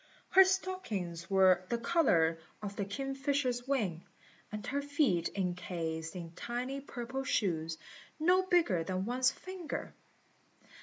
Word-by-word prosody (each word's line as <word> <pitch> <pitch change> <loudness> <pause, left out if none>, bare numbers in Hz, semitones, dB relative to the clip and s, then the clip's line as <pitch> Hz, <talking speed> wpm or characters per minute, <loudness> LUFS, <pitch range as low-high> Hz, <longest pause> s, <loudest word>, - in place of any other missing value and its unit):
Her 385 - +9
stockings 230 - -2
were 190 -2 +5
the 235 - +1
colour 205 - +3 0.2
of 200 -1 -4
the 200 - -2
kingfisher's 270 +2 -1
wing, 205 -12 0 0.5
and 210 0 -5
her 285 0 -1
feet 285 - +1
encased 170 -3 -3
in 170 -2 -6
tiny 245 +9 -4
purple 260 0 -5
shoes, 165 - 0 0.4
no 360 +4 +5
bigger 335 - +2
than 185 +2 -2
one's 255 +2 +3
finger. 365 +1 -6
235 Hz, 120 wpm, -33 LUFS, 180-280 Hz, 0.5 s, Her